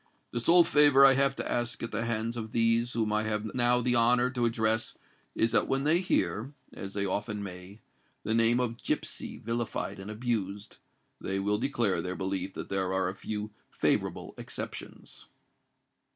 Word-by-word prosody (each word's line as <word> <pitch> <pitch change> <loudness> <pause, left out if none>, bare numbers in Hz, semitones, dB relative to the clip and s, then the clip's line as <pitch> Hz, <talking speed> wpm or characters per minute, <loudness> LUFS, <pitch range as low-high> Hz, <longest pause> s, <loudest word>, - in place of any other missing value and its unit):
The 120 - -2
sole 170 +8 +6
favour 145 -3 +6
I 135 - +8
have 135 0 +2
to - - -4
ask 120 -1 -2
at 115 - -4
the 115 +2 -2
hands 115 0 -2
of 110 -2 -6
these 115 +1 +2
whom 110 -2 0
I 105 - +2
have 110 0 -2
now 125 0 +3
the 125 0 +2
honour 120 +2 +3
to 125 -2 0
address, 110 -1 0 0.4
is 115 +1 +2
that - - +3
when 135 0 0
they 155 +4 +3
hear—as 120 - -3
they 100 -1 0
often 105 +2 -2
may—the 95 +3 -8
name 115 +1 +3
of 120 -2 -2
Gipsy - - -3
vilified 115 -3 -3
and 95 +2 -8
abused, 105 -3 -3 0.4
they 95 - -2
will 105 +2 0
declare 115 -9 0
their 90 +2 -4
belief 95 0 -3
that - - -6
there 95 -1 0
are 95 -1 +1
a 95 - -6
few 105 +1 -5 0.2
favourable - - -1
exceptions." - - -8
115 Hz, 170 wpm, -29 LUFS, 100-120 Hz, 0.4 s, I